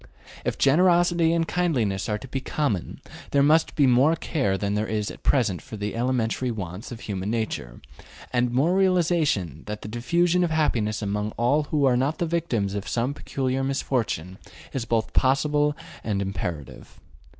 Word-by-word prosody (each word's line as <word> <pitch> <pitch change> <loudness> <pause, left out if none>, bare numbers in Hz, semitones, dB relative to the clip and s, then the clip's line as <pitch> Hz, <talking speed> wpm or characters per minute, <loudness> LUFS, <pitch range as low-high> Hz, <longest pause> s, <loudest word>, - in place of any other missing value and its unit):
If - - -2
generosity 170 +2 +4
and 165 -1 +1
kindliness 125 - 0
are 105 - 0
to 120 - -10
be 135 +1 -3
common, 125 - -2 0.3
there 140 -1 +3
must 155 +3 +3
be 145 - +4
more 130 +6 +4
care 135 - -1
than 100 +1 -1
there 105 +1 0
is 105 -1 -2
at - - -12
present 110 - +1
for 110 - -9
the 105 +1 -4
elementary 125 0 0
wants 100 -1 -6
of 120 -1 -8
human 100 -1 -4
nature, 110 - -3 0.5
and 120 0 +2
more 140 +9 +2
realization 165 - +1
that 105 0 -5
the - - -6
diffusion 170 +10 +1
of 175 - +1
happiness 115 -10 0
among 105 +1 -2
all 140 +6 +2
who 145 -1 +1
are 125 -2 +4
not 135 +5 0
the 170 - 0
victims 150 - -1
of 100 0 -4
some 120 +4 0
peculiar 135 -2 -2
misfortune 115 - -2 0.3
is 130 -4 -2
both 115 -1 -1
possible 145 +2 +2 0.3
and 105 -3 -1
imperative. 90 -7 -5
125 Hz, 170 wpm, -25 LUFS, 105-150 Hz, 0.5 s, generosity